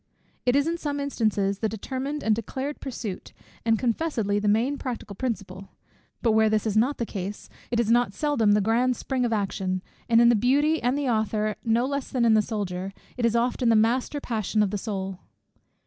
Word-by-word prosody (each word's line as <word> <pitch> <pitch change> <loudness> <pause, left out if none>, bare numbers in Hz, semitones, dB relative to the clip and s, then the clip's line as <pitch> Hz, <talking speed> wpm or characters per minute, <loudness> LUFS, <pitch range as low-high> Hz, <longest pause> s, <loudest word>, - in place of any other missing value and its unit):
It 245 - +4
is 285 0 +3
in 335 +1 -1
some 290 -2 -2
instances 215 -8 0
the 220 - 0
determined 265 +7 -4
and 220 - +3
declared 265 +6 -4
pursuit, 230 -8 -6 0.3
and 225 -1 +3
confessedly 230 -4 0
the 210 - -1
main 235 +7 +2
practical 235 -5 -5
principle; 195 -5 -4 0.5
but 230 - +4
where 220 0 +4
this 215 0 +1
is 215 -2 -1
not 250 +7 +2
the 235 - -1
case, 200 -1 -6 0.2
it 235 - 0
is 230 -1 +2
not 240 -3 +3
seldom 230 -3 +2
the 210 - +3
grand 240 +4 +2
spring 255 +1 -1
of 235 - -1
action, 190 -3 -1 0.3
and 230 0 +6
in 235 0 +7
the 240 - +5
Beauty 285 +8 +2
and 250 +3 +1
the 290 -2 -1
Author, 215 -2 0
no 230 +1 +2
less 280 0 -3
than 245 -3 +1
in 225 - +5
the 215 - +5
Soldier, 195 -3 -4 0.2
it 240 -2 +2
is 230 - 0
often 245 +1 +1
the 225 - +5
master 245 +6 +2
passion 215 -4 0
of 200 - -1
the 205 - -2
soul. 195 -3 -4
230 Hz, 205 wpm, -26 LUFS, 210-255 Hz, 0.5 s, in